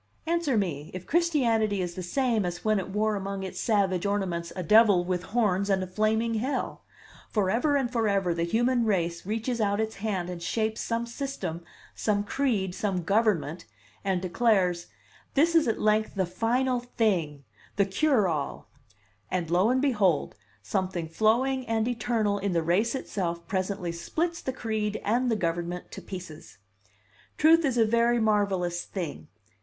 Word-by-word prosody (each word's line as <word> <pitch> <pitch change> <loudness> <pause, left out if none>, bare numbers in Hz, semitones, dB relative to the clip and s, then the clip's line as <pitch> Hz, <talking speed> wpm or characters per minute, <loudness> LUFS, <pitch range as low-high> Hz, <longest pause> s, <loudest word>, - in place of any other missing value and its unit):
Answer 330 -6 +1
me, 160 -7 -2
if 185 0 -6
Christianity 240 - +2
is 175 -1 -2
the 185 - -6
same 230 +4 0
as 175 +1 -4
when 215 -1 +3
it 190 - -5
wore 210 +2 0
among 195 0 -4
its 190 - -6
savage 195 -5 +1
ornaments 190 -4 -1
a 185 - -3
devil 205 -1 +5
with 180 -1 -1
horns 200 -2 0
and 190 -1 +2
a - - -2
flaming 215 +4 0
Hell! 250 +6 -2 0.5
Forever 225 +8 +1
and 260 -3 0
forever 200 -6 +1
the 170 - -3
human 240 +8 +2
race 175 -5 -1
reaches 225 +2 -2
out 205 0 +1
its 220 0 -2
hand 195 -4 -2
and 180 -1 -6
shapes 220 +5 -1
some 230 0 -1
system, 235 - -5 0.3
some 205 -2 0
creed, 205 -5 0
some 185 -2 -2
government, 195 -5 +1 0.4
and 190 -2 0
declares: 185 -3 +1 0.5
'This 325 +4 +4
is 325 -4 +4
at 225 - 0
length 215 0 +1
the 190 -1 +1
final 245 +7 0
thing, 190 - -1 0.3
the 200 - +3
cure 215 +1 +2
all,' 150 -5 -3 0.6
and 175 -3 -2
lo 185 +5 +4
and 260 +2 +2
behold, 205 - +2 0.3
something 185 - -2
flowing 235 +9 +2
and 225 0 0
eternal 225 -4 0
in 200 -1 -1
the 165 -1 +1
race 205 - +1
itself 170 -9 -3
presently 190 -2 -2
splits 330 - -2
the 260 - -2
creed 215 -4 -2
and 245 +4 +2
the 225 - +2
government 175 -1 -3
to - - -8
pieces! 155 - -9 0.8
Truth 325 +2 +5
is 265 -5 +1
a 225 - +5
very 235 +2 +3
marvelous 195 -5 +1
thing. 150 - -6
205 Hz, 160 wpm, -27 LUFS, 180-230 Hz, 0.8 s, devil